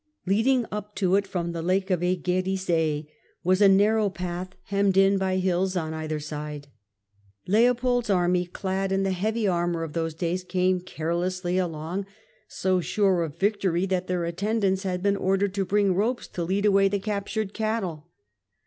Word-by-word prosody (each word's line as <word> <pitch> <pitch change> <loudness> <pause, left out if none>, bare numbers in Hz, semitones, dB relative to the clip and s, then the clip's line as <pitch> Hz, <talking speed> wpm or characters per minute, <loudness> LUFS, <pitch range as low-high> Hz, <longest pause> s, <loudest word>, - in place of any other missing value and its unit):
Leading 230 +6 +2
up 210 0 -6
to 185 -2 +1
it 200 0 +1
from 170 -3 -2
the 170 -1 -4
Lake 190 +3 0
of 180 -2 +1
Aegeri 180 -4 0 0.4
was 185 +2 +2
a 200 - +8
narrow 205 +2 +4
path, 180 0 -5
hemmed 200 -1 +1
in 195 0 +5
by 190 -1 0
hills 185 0 0
on 160 -2 -2
either 155 -1 -3
side. 150 -1 -6 0.8
Leopold's 245 +3 +2
army, 180 -1 +2
clad 190 +1 -2
in 195 0 +1
the 195 - 0
heavy 215 +4 0
armour 175 -2 0
of 155 -2 -6
those 165 -1 -2
days, 175 +2 -2
came 185 0 +1
carelessly 180 +1 -2
along, 175 +2 -3 0.4
so 185 -1 0
sure 195 -1 +2
of 160 -2 -4
victory 190 -2 +1
that 185 -1 -1
their 180 -2 -1
attendants 195 +2 0
had 185 -2 -3
been 200 0 +3
ordered 195 0 +1
to 200 -1 -1
bring 200 0 +2
ropes 225 +7 -1
to 175 - -4
lead 195 +4 0
away 195 -1 +5
the 200 +1 0
captured 205 0 -3
cattle. 205 -8 -2
185 Hz, 165 wpm, -26 LUFS, 175-200 Hz, 0.8 s, a